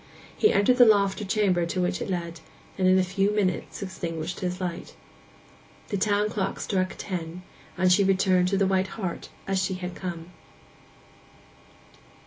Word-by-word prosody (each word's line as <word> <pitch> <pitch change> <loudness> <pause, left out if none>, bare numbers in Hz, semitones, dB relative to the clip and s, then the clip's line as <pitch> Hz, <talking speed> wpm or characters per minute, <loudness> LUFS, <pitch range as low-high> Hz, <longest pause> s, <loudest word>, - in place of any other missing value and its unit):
He 430 - +4
entered 250 +5 +3
the 245 - +8
loft 200 -2 +3
or - - -4
chamber 195 -3 +1
to 185 - -3
which 180 0 -1
it - - -4
led, 170 -2 -3 0.4
and 185 -1 +1
in 185 0 +5
a 190 - +4
few 195 +2 0
minutes 200 -3 -1
extinguished 170 -3 -5
his 180 0 -3
light. 175 -2 -5 0.9
The 205 - -1
town 205 +1 +2
clock 195 -2 -3
struck 185 -1 -1
ten, 180 -2 -5 0.3
and 185 0 +3
she 200 +3 +5
returned 190 -1 +3
to 195 +1 +1
the 195 - +3
White 190 0 +1
Hart 185 -6 -4 0.2
as 195 -1 +1
she 190 0 -1
had 180 -1 -5
come. 175 -2 -6
185 Hz, 165 wpm, -26 LUFS, 180-200 Hz, 0.9 s, the